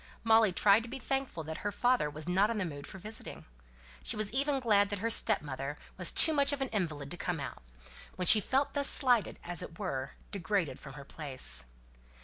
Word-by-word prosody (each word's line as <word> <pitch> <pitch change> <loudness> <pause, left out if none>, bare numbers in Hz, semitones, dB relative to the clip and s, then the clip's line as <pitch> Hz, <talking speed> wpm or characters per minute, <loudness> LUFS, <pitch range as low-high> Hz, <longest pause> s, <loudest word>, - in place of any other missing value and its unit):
Molly 225 -2 +4
tried 200 +4 +3
to 230 - -10
be 265 - -6
thankful 270 -10 -4
that 160 +1 -7
her 205 - -4
father 245 -8 0
was 150 +2 -8
not 190 +4 +2
in 230 - -3
the 195 - -2
mood 145 -4 -8
for - - -10
visiting. 215 +4 -4 0.6
She - - -3
was 215 0 -1
even 275 +1 0
glad 205 -5 +2
that 205 - -4
her 225 +4 -2
stepmother 145 -6 0 0.2
was - - 0
too 320 - +6
much 280 -1 +2
of 285 - -3
an 270 -1 -3
invalid 155 -9 -4
to 175 - -6
come 175 -3 -4
out, 135 - -7 0.5
when 180 - -4
she 215 - +9
felt 270 +7 -1
thus 280 -1 +5
slighted, 245 -7 +5
and 175 - -8
as 175 - -2
it 165 - -10
were, 135 -10 -5 0.2
degraded 175 -7 -2
from 140 -1 -12
her 140 0 -11
place. 130 - -6
200 Hz, 215 wpm, -30 LUFS, 155-230 Hz, 0.6 s, she